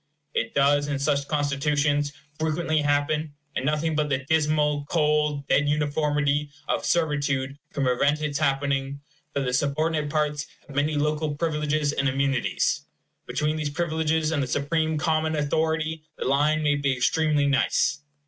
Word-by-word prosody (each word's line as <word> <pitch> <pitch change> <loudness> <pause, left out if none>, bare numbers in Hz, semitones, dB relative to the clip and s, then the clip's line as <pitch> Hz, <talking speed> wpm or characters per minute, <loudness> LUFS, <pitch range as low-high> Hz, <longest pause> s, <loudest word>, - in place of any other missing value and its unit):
It 115 - -2
does, 145 +1 +3
in 145 -1 -1
such 140 0 0
constitutions, 145 0 +1 0.3
frequently 155 0 0
happen 145 +1 0 0.2
and - - -1
nothing 150 +2 0
but 150 -1 0
the 130 -1 -1
dismal, 150 -1 +2
cold, 150 -3 +1
dead 145 0 +3
uniformity 145 -1 +1 0.2
of - - 0
servitude 145 -4 0
can 140 - -2
prevent 140 +4 +2
its 150 -2 -2
happening 140 -1 0 0.3
that 140 - 0
the 125 -2 -1
subordinate 150 +3 0
parts 150 -1 -1 0.2
have 145 - -12
many 145 +2 +1
local 150 0 0
privileges 150 -2 0
and 140 -1 +1
immunities. 135 -1 0 0.4
Between 150 +1 -1
these 155 -2 -2
privileges 160 0 0
and 150 -3 0
the 130 - -1
supreme 155 +4 0
common 160 0 +1
authority 160 +2 0 0.2
the - - -4
line 150 +3 +2
may 145 -1 +3
be 140 -2 +1
extremely 150 +2 +2
nice. 140 +1 +2
150 Hz, 150 wpm, -25 LUFS, 140-155 Hz, 0.4 s, does